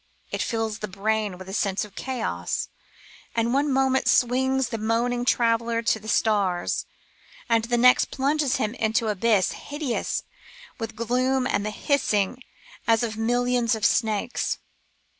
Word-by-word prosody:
It - - -2
fills 225 -2 -2
the 210 - -4
brain 210 0 -1
with 185 0 -10
a 190 - -7
sense 195 -1 0
of 205 - -15
chaos, 155 - -3 0.7
and 230 +1 +1
one 285 +2 +2
moment 265 -1 +2
swings 260 +1 +2
the 225 - -4
moaning 240 +3 0
traveller 230 -1 +2
to 225 - +1
the 215 - -12
stars, 200 -5 +1 0.6
and 230 -2 +2
the 240 +1 0
next 250 +1 +5
plunges 280 0 +1
him 215 +1 -1
into 225 -1 0
an 215 - +1
abyss 205 -1 +2
hideous 290 -5 -3 0.6
with 225 -1 -5
gloom 255 +3 +1
and 200 - 0
the 210 - -2
hissing 230 -2 0 0.5
as 225 0 +4
of 220 -2 -2
millions 240 +1 +1
of 215 - -2
snakes. 220 +1 +1
230 Hz, 150 wpm, -25 LUFS, 215-250 Hz, 0.7 s, next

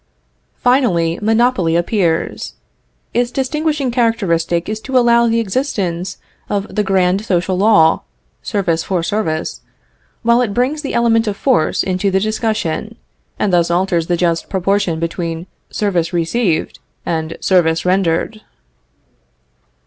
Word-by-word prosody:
Finally, 185 -11 +1
monopoly 220 -6 +2
appears. 170 -2 -1 0.6
Its 240 0 +1
distinguishing 290 +1 -1
characteristic 195 -8 0
is 215 0 -3
to 260 +3 -1
allow 235 -1 +4
the 230 0 +2
existence 190 -6 -2 0.3
of 200 0 -2
the 210 - +1
grand 190 0 +1
social 185 -3 0
law 190 -5 +4 0.4
service 180 -7 -1
for 180 -3 -1
service 165 -5 -2 0.6
while 235 +1 +4
it 210 -5 -1
brings 270 +5 0
the 285 - -4
element 230 -1 +2
of 200 -1 -2
force 245 - +1
into 185 +1 0
the 190 0 +2
discussion, 215 -1 -2 0.4
and 195 - 0
thus 170 -1 +3
alters 175 -1 +1
the 175 - +1
just 170 -1 0
proportion 190 -2 0
between 165 0 -3 0.2
service 180 -6 -1
received 170 +1 0 0.3
and 160 -1 -3
service 165 -3 +2
rendered. 185 +3 0
195 Hz, 125 wpm, -17 LUFS, 170-230 Hz, 0.6 s, allow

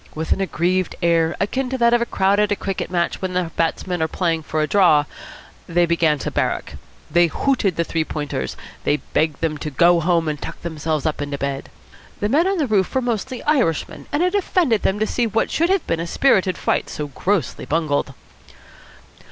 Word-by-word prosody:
With 160 +1 -4
an - - +2
aggrieved 185 0 0
air, 165 -1 +2
akin 255 +6 -1
to 260 - -2
that 235 -1 +4
of 240 - +3
a 235 - 0
crowd 195 +1 +2
at 210 -1 +2
a - - +3
cricket 195 -1 -4
match 175 -1 -1
when 180 -3 -2
batsmen 175 +1 -1
are 160 - +2
playing 165 -1 -1
for 155 0 -3
a - - 0
draw, 170 -7 +4 0.6
they 175 +1 +3
began 165 -3 +2
to - - -4
"barrack." - - -1 0.4
They 175 0 +5
hooted 210 - 0
the 170 - +1
Three 165 -1 -1
Pointers. 145 - -4 0.3
They 145 - +2
begged 155 0 -1
them 155 -2 -1
to 155 - -4
go 170 +5 +4
home 165 0 +1
and 150 -2 -3
tuck - - -7
themselves 155 -2 -2
up 155 -2 -1
in 145 - -3
bed. 140 -1 -3 0.5
The 205 - 0
men 315 +9 +3
on 390 0 +1
the 310 - +1
roof 205 -4 +1
were - - +4
mostly 245 +1 -3
Irishmen, 250 - 0
and 290 +4 +1
it 365 +1 +1
offended 345 - +2
them 190 - +1
to 215 - +1
see 235 +1 0
what 225 +1 0
should 335 +2 +1
have 385 -3 +1
been 165 - -1
a 170 - -3
spirited 190 -4 +2
fight - - 0
so 150 - -4
grossly 165 +3 -2
bungled. 145 -4 0
175 Hz, 205 wpm, -21 LUFS, 160-220 Hz, 0.6 s, They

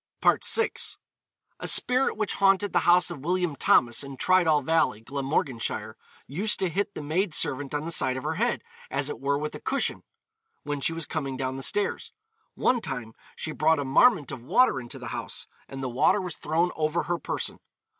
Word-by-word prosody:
VI. 455 0 +4 0.9
A - - -4
spirit 255 0 +3
which 215 -2 0
haunted 195 +1 +2
the - - +4
house 180 0 +4
of 165 - -7
William 175 -2 0
Thomas, 120 -2 +3
in 140 -1 -9
Tridoll 165 -5 +3
Valley, 155 -7 +1
Glamorganshire, 130 -4 -2 0.3
used 195 +10 +1
to 190 - +1
hit 200 +4 -2
the - - -6
maid 165 +3 0
servant 145 0 +1
on 145 +1 -2
the 165 - -4
side 130 -5 +1
of 130 - -6
her - - -1
head, - - -1 0.3
as 140 +1 -1
it - - -6
were 140 +1 0
with 150 +1 -4
a - - -7
cushion, 275 - -1 0.6
when 145 -1 -4
she 165 - +1
was 165 -1 -3
coming 135 -4 -4
down 130 0 -3
the 135 - -6
stairs. 205 +8 -1 0.4
'One 245 -2 +1
time 115 - -5 0.2
she 155 - -3
brought 160 +1 +2
a 145 - -2
marment 145 - +4
of 130 - -7
water 135 - +3
into 120 -2 -8
the - - -7
house,' - - -6 0.2
and 135 0 -7
the - - -1
water 125 +11 +2
was 180 -4 -4
thrown 165 +4 0
over 155 +2 0
her 170 +3 -2
person. - - -3
155 Hz, 195 wpm, -26 LUFS, 135-180 Hz, 0.9 s, VI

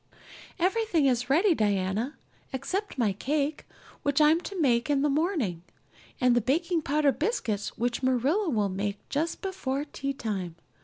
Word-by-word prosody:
"Everything 370 -3 +2
is 250 -1 +1
ready, 345 +7 +4
Diana, 210 +3 0 0.3
except 365 +9 -3
my 220 -6 +2
cake 290 +7 -2 0.3
which 285 0 +1
I'm 310 +3 +5
to 390 0 -6
make 250 -3 +2
in 285 -1 +2
the 295 - +2
morning, 290 - 0 0.6
and 250 -1 +4
the 240 - +3
baking 330 - +1
powder 295 0 +2
biscuits 235 - -2
which 240 +1 -1
Marilla 270 - +2
will 215 -7 +1
make 200 +2 -4
just 315 +4 -2
before 290 -8 -2
teatime. 220 - -4
275 Hz, 145 wpm, -28 LUFS, 235-320 Hz, 0.6 s, I'm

